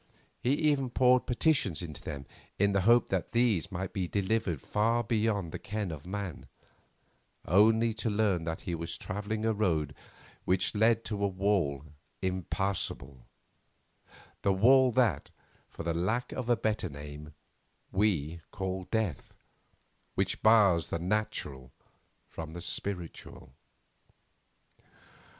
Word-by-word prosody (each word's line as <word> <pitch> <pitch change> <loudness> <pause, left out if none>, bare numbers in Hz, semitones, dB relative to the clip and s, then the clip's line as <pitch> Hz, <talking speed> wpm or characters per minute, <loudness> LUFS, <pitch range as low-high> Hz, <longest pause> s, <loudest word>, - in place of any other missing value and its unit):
He 125 - +1
even 145 -3 +2
poured 125 +1 +4
petitions 120 - +1
into 75 -4 -7
them 70 -1 -6 0.3
in 100 +1 +3
the 95 -1 +2
hope 120 +1 +5
that 95 -3 -2
these 115 -6 +2
might 95 +1 -4
be 95 -4 -1
delivered 100 -4 0
far 115 - +1
beyond 105 -5 0
the - - -5
ken 105 -2 -3
of 80 +1 -8
man, 100 -2 -5 1.0
only 110 +5 +4
to 110 +1 -2
learn 100 -5 +1
that 80 0 -3
he 90 - -4
was 85 0 -4
travelling 105 +2 -3
a 110 - +2
road 80 -9 0 0.5
which 95 0 +1
led 110 +2 +3
to 105 -2 -3
a - - +4
wall 95 -8 0 0.3
impassable; 95 -7 -3 1.1
the 100 - +2
wall 125 +6 +5
that, 110 - +1 0.4
for - - -8
the 85 0 0
lack 110 +9 -1
of 125 -2 -4
a 120 - +4
better 110 -4 -1
name, 75 +1 -9 0.6
we 85 -5 0
call 95 -1 -4
Death, 110 - -2 0.8
which - - -1
bars 100 -8 +5
the - - -2
natural 80 -9 -2 0.6
from 80 -1 -7
the 85 - -6
spiritual. 85 -8 -5
100 Hz, 130 wpm, -30 LUFS, 85-110 Hz, 1.1 s, hope